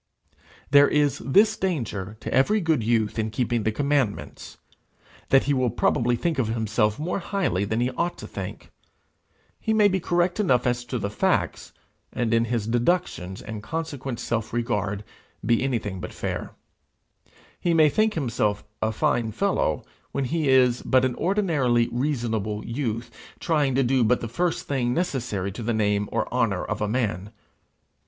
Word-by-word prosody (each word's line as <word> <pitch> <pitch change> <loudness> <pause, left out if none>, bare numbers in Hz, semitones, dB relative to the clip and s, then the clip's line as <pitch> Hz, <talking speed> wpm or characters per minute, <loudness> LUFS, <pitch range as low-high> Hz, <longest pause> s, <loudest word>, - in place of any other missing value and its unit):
There 145 0 +7
is 145 -2 +2
this 205 +11 +4
danger 110 - -3
to - - -4
every 205 +12 +3
good 160 - +1
youth 110 -1 +1
in 110 0 0
keeping 120 +1 0
the 110 - 0
commandments, 140 -3 -2 0.7
that 135 - +5
he 145 - +1
will 130 -2 +2
probably 120 +1 +1
think 160 +4 -1
of 120 - +1
himself 110 -1 0
more 170 +6 -2
highly 175 - -1
than 110 +3 -1
he 125 +1 +1
ought 175 +5 -2
to - - -8
think. - - -7 0.9
He 220 -1 0
may 210 -1 +6
be 190 -1 +1
correct 175 +2 0
enough 130 - +2
as 125 0 0
to 125 +1 -3
the 100 -3 -3
facts, - - 0 0.4
and 115 -2 -1
in 115 0 +3
his 115 -2 -1
deductions, 115 - -1
and 110 -1 -6
consequent 140 -2 -4
self 115 -2 -2
regard, 105 -3 -1 0.4
be 115 0 +3
anything 110 -8 -2
but - - -6
fair. - - -4 1.0
He 170 -1 +1
may 155 -1 +6
think 215 +8 +2
himself 110 -8 0 0.2
a 110 - +1
fine 110 +1 0
fellow, 110 - 0 0.3
when 140 - -1
he 155 +1 0
is 125 -2 +4
but 130 0 +3
an 130 - 0
ordinarily 150 - +1
reasonable 115 -6 -2
youth, 115 -2 -3 0.3
trying 145 -6 +1
to 135 - +3
do 130 0 +2
but 120 +3 +3
the 115 - -4
first 170 +9 -1
thing 125 -3 0
necessary 120 - -2
to 110 - -7
the 115 0 -1
name 105 -1 +1
or - - 0
honour 115 -7 +1
of 105 - -3
a 105 - +1
man. 105 -4 -2
120 Hz, 165 wpm, -25 LUFS, 110-145 Hz, 1.0 s, There